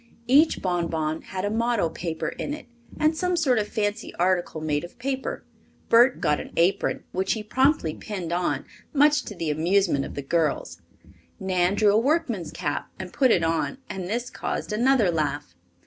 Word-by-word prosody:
Each 290 +6 +4
bonbon 165 -3 -1
had 190 +1 -5
a 205 - -1
motto 230 -4 +1
paper 165 0 -4
in 290 - -4
it 300 - -12 0.3
and 310 +1 +3
some 360 +2 0
sort 270 -9 +2
of 210 - -1
fancy 210 +1 -2
article 175 -2 0
made 150 -1 -1
of 175 - -10
paper. 265 +1 -3 0.4
Bert 240 +3 +5
got 150 - +1
an - - -8
apron, 185 +4 +1
which 190 +1 0
he 220 - -4
promptly 260 - +2
pinned 180 -4 -5
on, 175 0 -1 0.3
much 295 -1 +4
to 210 - -7
the 165 -3 -2
amusement 170 -1 +2
of - - -7
the 140 - -4
girls. 160 +2 -1 0.6
Nan 185 0 +1
drew 205 -1 +4
a 215 - +5
workman's 240 - 0
cap 150 -5 -3
and 185 -1 -7
put 260 -2 +3
it 175 -7 +3
on, 165 - 0
and 185 -2 -5
this 235 +5 -3
caused - - -4
another 235 -3 +3
laugh. 145 - -2
195 Hz, 180 wpm, -25 LUFS, 170-245 Hz, 0.6 s, Bert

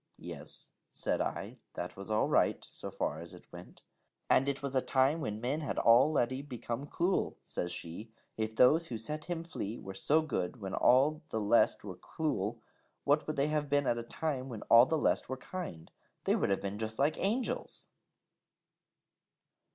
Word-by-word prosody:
'Yes,' - - -7 0.2
said - - -1
I, - - -4 0.2
'that 90 - -5
was 100 +1 -8
all 110 0 +2
right, - - +2
so - - -7
far 75 - -2
as 85 +1 -8
it - - -15
went.' - - -12 0.5
'And 135 +2 +5
it 140 0 -3
was 140 -1 -2
a 130 - +4
time 135 +6 +2
when 105 -6 -3
men 135 +7 -1
had 145 - -3
al 120 +6 +6
leady 130 -2 +1
become 130 -1 -5
cluel,' 175 +5 0
says 90 - -3
she: 90 +5 -7 0.2
'if 110 0 -2
those 155 +8 +5
who 120 - -4
set 150 +8 -4
him 170 -2 -3
flee 115 -9 -5
were 95 - -8
so 155 +10 +2
good 120 - -2
when 95 -2 -5
all 145 +5 +4
the 110 - -1
lest 110 +1 +3
were 95 -3 -7
cluel, 115 - -2 0.5
what 145 +2 +2
would 155 - -2
they 140 +1 +1
have 150 -1 0
been 145 0 +2
at 120 - +1
a - - -2
time 135 +2 -3
when 115 -4 -6
all 115 +2 +9
the 160 - +1
lest - - +1
were 130 - -3
kind? 130 - -7 0.3
They - - +3
would - - +1
have 100 - +1
been 100 +1 -4
just 110 0 -3
like 145 +3 +2
Angels....!' 230 +6 -1
130 Hz, 190 wpm, -32 LUFS, 110-150 Hz, 0.5 s, all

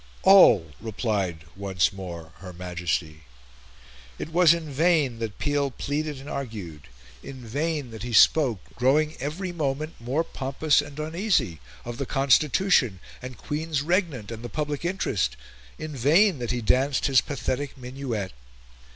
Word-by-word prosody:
"All," 115 - +7
replied 100 -7 -2
once 95 -1 0
more 85 -4 -8
her 90 -2 -10
Majesty. 85 -3 -3 1.0
It - - -5
was 175 -2 +6
in 170 -2 0
vain 145 -4 +2
that 110 -3 -4
Peel 145 -1 0
pleaded 145 +2 -3
and 135 - -11
argued; 105 - -6 0.3
in 130 -3 -10
vain 145 +2 -2
that 110 - -9
he 120 - -5
spoke, 120 - +5
growing 150 +5 +2
every 160 +8 -4
moment 155 -1 -2
more 130 +7 -1
pompous 145 0 +1
and 145 0 -11
uneasy, 160 - 0 0.3
of 120 +2 -6
the 140 - -3
constitution, 140 - +3 0.2
and 125 -1 -8
Queens 150 -1 -2
Regnant, 160 - -1
and 115 -1 -7
the 120 - -5
public 150 -1 -3
interest; 170 - -1 0.4
in 155 -1 -6
vain 155 - +4
that 120 -2 -4
he 125 - -1
danced 130 +5 +2
his 135 -3 +5
pathetic 140 0 -3
minuet. 125 -6 -5
135 Hz, 140 wpm, -25 LUFS, 110-155 Hz, 1.0 s, All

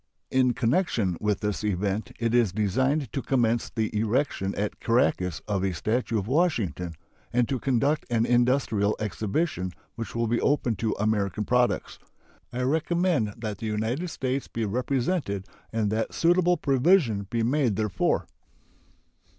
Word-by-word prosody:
In 130 -2 +3
connection 115 - +1
with 105 -1 0
this 105 0 -2
event 105 +3 -1
it 115 -1 0
is 120 -5 +4
designed 130 - 0
to 135 - -1
commence 120 -4 +1
the 110 -1 -2
erection 110 -2 0
at 105 +1 -3
Caracas 115 - +1
of 100 -3 0
a 95 -2 0
statue 110 +7 0
of 100 - -1
Washington 110 - 0 0.4
and 120 -1 +2
to 135 - -1
conduct 135 +5 +1
an 115 -1 +2
industrial 120 -4 +2
exhibition 105 - -2 0.2
which 115 -1 -6
will 115 0 +1
be 120 +1 0
open 130 -5 +1
to 110 +2 -1
American 105 -1 0
products. 125 -1 +1 0.5
I 125 +1 -2
recommend 160 - +1
that 105 -3 -5
the 110 - -4
United 110 +10 -1
States 135 -2 -2
be 115 -1 -3
represented 125 - -1 0.3
and 110 -2 0
that 110 +1 -1
suitable 175 +1 +3
provision 135 - +2
be 115 +1 0
made 125 -3 +2
therefor. 105 -2 0
115 Hz, 145 wpm, -26 LUFS, 105-130 Hz, 0.5 s, is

